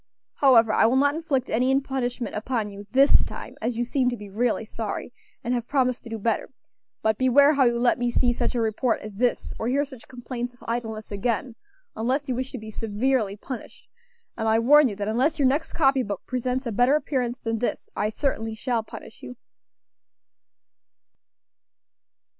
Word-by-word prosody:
However, 230 Hz, -6 st, +5 dB
I -, -, +5 dB
will 240 Hz, -, +2 dB
not 285 Hz, +2 st, +3 dB
inflict 295 Hz, -5 st, -1 dB
any 255 Hz, +4 st, +2 dB
punishment 255 Hz, -3 st, -3 dB
upon 215 Hz, -1 st, -2 dB
you 200 Hz, 0 st, -10 dB
this 270 Hz, +5 st, +5 dB
time, -, -, -7 dB
as 235 Hz, +1 st, -2 dB
you 240 Hz, -, 0 dB
seem 250 Hz, 0 st, +1 dB
to 245 Hz, -, -4 dB
be 205 Hz, -2 st, -10 dB
really 225 Hz, +1 st, 0 dB
sorry, 225 Hz, +2 st, -5 dB, 0.3 s
and 240 Hz, +1 st, -1 dB
have 240 Hz, -1 st, -2 dB
promised 255 Hz, -3 st, +1 dB
to 235 Hz, -, -10 dB
do 225 Hz, -, -4 dB
better; 220 Hz, +1 st, -1 dB, 0.5 s
but 220 Hz, -1 st, +1 dB
beware 280 Hz, +3 st, +5 dB
how 275 Hz, -3 st, +4 dB
you 240 Hz, -1 st, +2 dB
let 240 Hz, 0 st, +2 dB
me 245 Hz, 0 st, +1 dB
see 240 Hz, 0 st, +2 dB
such 245 Hz, -, -2 dB
a 235 Hz, -, +1 dB
report 225 Hz, +2 st, 0 dB
as 215 Hz, -1 st, -8 dB
this, 240 Hz, +4 st, -1 dB
or 225 Hz, -, -2 dB
hear 280 Hz, +4 st, +1 dB
such 260 Hz, -4 st, -13 dB
complaints 245 Hz, -1 st, -6 dB
of -, -, -19 dB
idleness 225 Hz, -2 st, -4 dB
again, 230 Hz, +4 st, -1 dB, 0.4 s
unless 260 Hz, +6 st, -1 dB
you 255 Hz, -, 0 dB
wish 255 Hz, +1 st, -3 dB
to -, -, -5 dB
be 220 Hz, -1 st, -8 dB
severely 215 Hz, 0 st, -1 dB
punished; 250 Hz, +3 st, -9 dB, 0.5 s
and 225 Hz, -1 st, -2 dB
I 220 Hz, 0 st, +4 dB
warn 285 Hz, +5 st, +6 dB
you 210 Hz, -, -4 dB
that 205 Hz, 0 st, -4 dB
unless 260 Hz, +9 st, +1 dB
your 280 Hz, -3 st, +3 dB
next 290 Hz, +5 st, 0 dB
copy 270 Hz, -4 st, +3 dB
book 200 Hz, -5 st, -4 dB
presents 255 Hz, +1 st, -2 dB
a 235 Hz, -, -2 dB
better 245 Hz, +6 st, +3 dB
appearance 255 Hz, -4 st, -1 dB
than 225 Hz, -1 st, -3 dB
this, 245 Hz, -, -2 dB
I 210 Hz, -, 0 dB
certainly 225 Hz, -2 st, -2 dB
shall 235 Hz, +1 st, -1 dB
punish 220 Hz, 0 st, -12 dB
you. 250 Hz, -, -9 dB
245 Hz, 190 wpm, -25 LUFS, 225-265 Hz, 0.5 s, warn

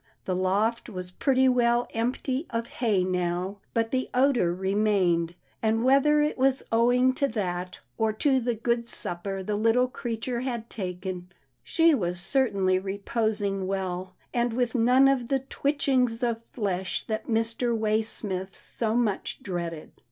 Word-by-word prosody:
The 185 Hz, -, -1 dB
loft 205 Hz, +6 st, 0 dB
was 185 Hz, -3 st, -6 dB
pretty 265 Hz, +6 st, +2 dB
well 240 Hz, -1 st, +3 dB
empty 255 Hz, +5 st, -1 dB
of 230 Hz, 0 st, -2 dB
hay 215 Hz, -7 st, 0 dB
now, 180 Hz, +2 st, -2 dB, 0.2 s
but 225 Hz, -1 st, +1 dB
the 260 Hz, 0 st, -1 dB
odour 250 Hz, -9 st, +3 dB
re 190 Hz, +2 st, -2 dB
mained, 180 Hz, -5 st, +2 dB, 0.3 s
and 225 Hz, +1 st, +1 dB
whether 275 Hz, +3 st, +4 dB
it 300 Hz, -3 st, -1 dB
was 265 Hz, 0 st, +2 dB
owing 245 Hz, +3 st, +4 dB
to 280 Hz, +1 st, +1 dB
that, 180 Hz, -6 st, -3 dB, 0.2 s
or 220 Hz, -1 st, +2 dB
to 265 Hz, +4 st, +2 dB
the 240 Hz, -1 st, -1 dB
good 235 Hz, +1 st, -1 dB
supper 190 Hz, -1 st, -2 dB
the 210 Hz, +2 st, -2 dB
little 225 Hz, +4 st, +3 dB
creature 240 Hz, -1 st, -4 dB
had 240 Hz, -3 st, -4 dB
taken, 180 Hz, -2 st, -5 dB, 0.3 s
she 330 Hz, -1 st, +4 dB
was 180 Hz, -8 st, -1 dB
certainly 195 Hz, -4 st, +2 dB
reposing 200 Hz, 0 st, -2 dB
well, 185 Hz, -1 st, -3 dB, 0.2 s
and 240 Hz, -1 st, +1 dB
with 245 Hz, 0 st, 0 dB
none 250 Hz, +2 st, +5 dB
of 265 Hz, -3 st, +1 dB
the 270 Hz, 0 st, +1 dB
twitchings 265 Hz, -4 st, 0 dB
of 230 Hz, -1 st, 0 dB
flesh 190 Hz, -5 st, -2 dB
that 220 Hz, -1 st, -3 dB
Mr. 230 Hz, +1 st, 0 dB
Waysmith 215 Hz, -3 st, -1 dB
so 225 Hz, -1 st, -2 dB
much 225 Hz, -5 st, -1 dB
dreaded. 170 Hz, -4 st, -4 dB
225 Hz, 150 wpm, -27 LUFS, 190-250 Hz, 0.3 s, none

